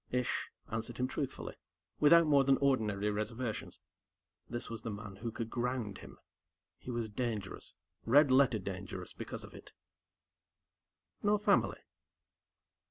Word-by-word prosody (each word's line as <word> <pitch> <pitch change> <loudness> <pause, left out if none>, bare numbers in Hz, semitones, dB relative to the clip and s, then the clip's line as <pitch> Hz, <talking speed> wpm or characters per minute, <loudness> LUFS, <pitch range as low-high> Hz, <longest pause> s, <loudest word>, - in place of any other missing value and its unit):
Ish 125 -1 -1 0.2
answered 115 0 -3
him 125 - +1
truthfully, 135 0 -4 0.5
without 170 +3 +7
more 145 -3 +5
than 135 0 +4
ordinary 105 -7 +2
reservations. 110 +2 -3 0.7
This 120 0 -4
was 115 -1 -6
the - - -4
man 105 -2 -7
who 115 +3 -4
could 115 0 -5
ground 120 -5 -2
him - - -12 0.6
He - - -9
was 120 -2 -1
dangerous 110 -3 -4 0.3
red 140 +4 +6
letter 130 -3 +5
dangerous 95 -1 -6
because - - -6
of - - -11
it. - - -12 1.5
"No 210 0 +4
family." 210 - +2
120 Hz, 130 wpm, -34 LUFS, 105-130 Hz, 1.5 s, without